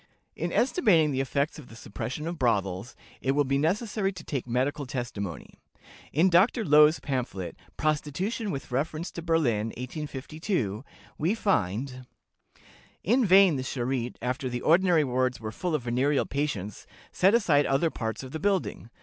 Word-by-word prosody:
'" - - -47
In - - -2
estimating 205 - +3
the 135 -1 0
effects 140 +3 -1
of 140 - -12
the 115 - -12
suppression 125 +7 -6
of 170 0 -4
brothels, 100 -3 0 0.3
it 135 - +1
will 145 +1 +3
be 135 0 0
necessary 195 +5 0
to 175 -3 -10
take 135 -6 -4
medical 130 +3 -1
testimony. 105 - -5 0.5
In 160 +6 +4
Dr. 195 +6 +3
Loewe's 150 0 +6
pamphlet, 120 -10 -3 0.2
"Prostitution 155 - -1
with 135 -6 -5
reference 155 +6 -2
to 170 - -6
Berlin, 145 -11 +1
1852," 135 - -4 0.4
we 170 +8 +1
find: 125 - -1 1.0
"In 245 +8 +3
vain 190 -5 +6
the - - -2
Charité, 125 -1 -2
after 130 +2 -2
the 120 0 -4
ordinary 170 -1 +4
wards 130 -1 0
were 110 -1 -5
full 175 +6 -2
of 140 - -2
venereal 130 +4 +1
patients, 125 -9 -3 0.2
set 195 +4 +4
aside 150 -11 +3
other 150 +4 +2
parts 110 +2 -4
of 130 - -9
the 160 - -4
building. 190 - -1
145 Hz, 160 wpm, -27 LUFS, 125-170 Hz, 1.0 s, Loewe's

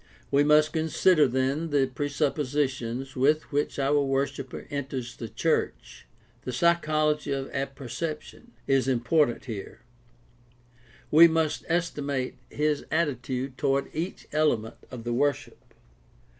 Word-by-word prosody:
We 140 +1 +4
must 150 +1 +4
consider, 160 0 +3
then, 135 +6 0
the 145 -2 +3
presuppositions 135 -2 -2
with 150 +4 +2
which 145 +1 -1
our 145 +1 +2
worshiper 135 -1 -2
enters 130 -3 -4
the 115 - -7
church. - - -2 0.3
The 125 - -5
psychology 155 0 +1
of 135 -1 -3
apperception 140 - -5
is 135 -2 +2
important 130 +1 +1
here. 110 -1 -7 1.3
We 165 +3 +9
must 160 -2 0
estimate 145 -6 -1 0.2
his 150 -1 0
attitude 135 -4 -2
toward 135 0 0
each 170 +4 -4
element 135 -8 +1
of 125 -3 -8
the 120 0 -2
worship. 145 +3 -1
140 Hz, 115 wpm, -27 LUFS, 130-155 Hz, 1.3 s, We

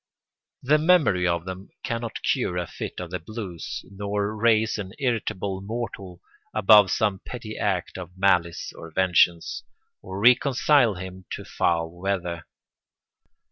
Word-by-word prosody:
The 150 +4 +4
memory 150 - +4
of 85 0 0
them 95 +1 -7
cannot 115 -2 -4
cure 90 - 0
a 90 - -1
fit - - -7
of 90 -2 -6
the 90 - -3
blues 90 -3 -6
nor 100 +2 -3
raise 110 0 +2
an 95 -1 -6
irritable 100 -7 -2
mortal 100 -4 -6 0.3
above 105 -1 +7
some 100 -1 +1
petty 110 -2 -8
act - - -2
of 90 0 -10
malice 90 -3 +1
or 80 - -10
vengeance, 85 -1 +2 0.4
or 95 +1 -7
reconcile 125 0 +4
him 95 0 -8
to - - -6
foul 85 -1 0
weather. 90 -2 -3
95 Hz, 135 wpm, -25 LUFS, 90-110 Hz, 0.4 s, above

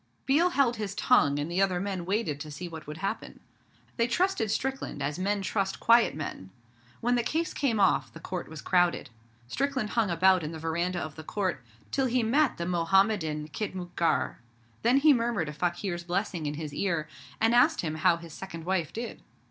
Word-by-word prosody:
Biel 315 +7 +4
held 270 -8 +2
his 205 -2 -4
tongue, 145 - +4
and 145 +1 -2
the 180 +3 +1
other 185 -2 +2
men 190 -2 -3
waited 190 -8 -1
to 155 +1 -7
see 150 +5 -6
what 160 -3 -9
would 150 +1 -6
happen. 195 - -4 0.6
They 230 -1 +2
trusted 245 - +1
Strickland 265 - -2
as 145 +4 -2
men 200 +1 0
trust 195 -1 -1
quiet 235 0 +5
men. 145 -11 -6 0.5
When 245 +1 +2
the 245 - +3
case 320 +7 -1
came 240 -7 0
off 135 -11 +3
the - - -11
Court 180 -1 -5
was 160 -2 -9
crowded. 175 -7 +2 0.4
Strickland 265 - -1
hung 225 -4 +1
about 185 +2 +4
in 155 +1 -5
the - - -5
veranda 170 +3 -1
of 155 -3 -5
the 160 - -7
Court, 185 -5 -2 0.3
till 270 -1 +1
he 245 0 +1
met 275 +5 +2
the 170 - -3
Mohammedan 170 -3 +1
khitmutgar. 175 -6 -1 0.4
Then 240 +4 +4
he 295 +1 +6
murmured 230 - 0
a - - -6
fakir's 175 +2 -2
blessing 175 -3 -2
in 145 - -3
his 150 -1 -6
ear, 170 -3 -1 0.3
and 225 +1 +3
asked 255 +7 +4
him 155 -3 -2
how 155 +2 +3
his 165 -2 -11
second 170 -4 -7
wife 175 -5 0
did. 235 +2 -6
185 Hz, 195 wpm, -28 LUFS, 160-230 Hz, 0.6 s, he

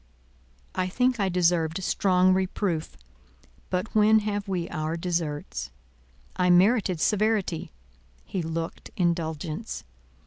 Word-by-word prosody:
I 185 0 0
think 250 +5 +1
I 195 -2 +2
deserved 175 -1 +1
strong 185 0 +3
reproof; 185 -3 -1 0.7
but 180 +4 -2
when 215 0 +5
have 205 -1 -2
we 180 -3 -2
our 155 0 -2
deserts? 165 -4 -3 0.7
I 180 -1 +2
merited 185 0 +4
severity; 210 - +1 0.5
he 190 - -3
looked 165 0 -4
indulgence. 170 +2 -2
180 Hz, 105 wpm, -26 LUFS, 165-200 Hz, 0.7 s, when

